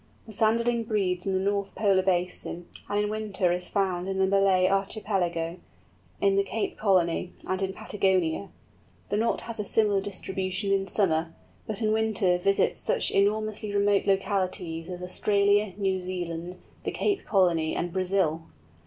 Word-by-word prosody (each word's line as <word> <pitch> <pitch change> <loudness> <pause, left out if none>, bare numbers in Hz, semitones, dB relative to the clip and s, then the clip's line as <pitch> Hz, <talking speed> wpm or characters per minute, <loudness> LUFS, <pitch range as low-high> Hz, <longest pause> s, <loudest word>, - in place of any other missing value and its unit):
The 220 - -11
Sanderling 230 +2 +1
breeds 190 -4 0
in 195 - +1
the 190 - +2
North 200 0 -1
Polar 200 -3 +3
Basin, 180 -2 -1 0.2
and 205 0 +1
in - - 0
winter 205 -4 0
is 180 0 -2
found 185 -2 0
in 195 0 -2
the 190 - +3
Malay 190 -1 +3
Archipelago, 190 -4 -1 0.6
in 195 -1 +3
the 200 - +4
Cape 215 +2 -3
Colony, 180 -3 +1
and 185 +1 -2
in 190 0 0
Patagonia; 190 -2 0 0.6
the 205 - 0
Knot 225 +2 +1
has 230 -1 -7
a - - 0
similar 205 -1 +2
distribution 190 0 -3
in 195 0 +1
summer, 165 -4 0 0.3
but 215 +1 -3
in 215 - +2
winter 215 -5 +2
visits 195 +2 +1
such - - +1
enormously 210 +1 0
remote 200 0 +2
localities 185 -4 -1
as 180 0 -6
Australia, 200 +2 +2
New 190 -2 0
Zealand, 180 -1 -5 0.3
the - - -1
Cape 405 -2 -1
Colony, 175 -6 +2
and 175 0 -2
Brazil! 185 -4 0
195 Hz, 155 wpm, -27 LUFS, 180-205 Hz, 0.6 s, the